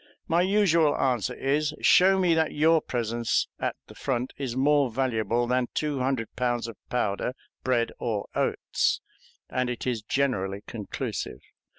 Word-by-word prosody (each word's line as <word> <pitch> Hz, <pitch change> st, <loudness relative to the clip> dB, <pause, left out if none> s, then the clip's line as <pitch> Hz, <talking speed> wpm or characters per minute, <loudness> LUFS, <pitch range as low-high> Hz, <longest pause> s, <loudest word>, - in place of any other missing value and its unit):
My 170 Hz, +1 st, +3 dB
usual 180 Hz, -6 st, +3 dB
answer 125 Hz, -2 st, +1 dB
is, 150 Hz, +3 st, 0 dB
"Show 190 Hz, +1 st, +6 dB
me 180 Hz, -3 st, +3 dB
that 160 Hz, -1 st, +1 dB
your 160 Hz, +2 st, +4 dB
presence 115 Hz, -1 st, -1 dB
at -, -, -1 dB
the -, -, -13 dB
front 125 Hz, -1 st, -2 dB
is 130 Hz, -4 st, -4 dB
more 140 Hz, 0 st, +3 dB
valuable 120 Hz, -1 st, 0 dB
than 125 Hz, 0 st, +1 dB
two 150 Hz, -3 st, -1 dB
hundred 130 Hz, -3 st, -1 dB
pounds 120 Hz, -2 st, 0 dB
of 115 Hz, -, -7 dB
powder, 125 Hz, +1 st, -1 dB, 0.3 s
bread, 120 Hz, -2 st, +1 dB
or 110 Hz, -4 st, -2 dB
oats"; -, -, 0 dB, 0.5 s
and 125 Hz, -1 st, -1 dB
it 125 Hz, -, -4 dB
is 120 Hz, -4 st, -1 dB
generally 105 Hz, -5 st, -1 dB
conclusive. 100 Hz, -, -5 dB
125 Hz, 150 wpm, -27 LUFS, 115-150 Hz, 0.5 s, Show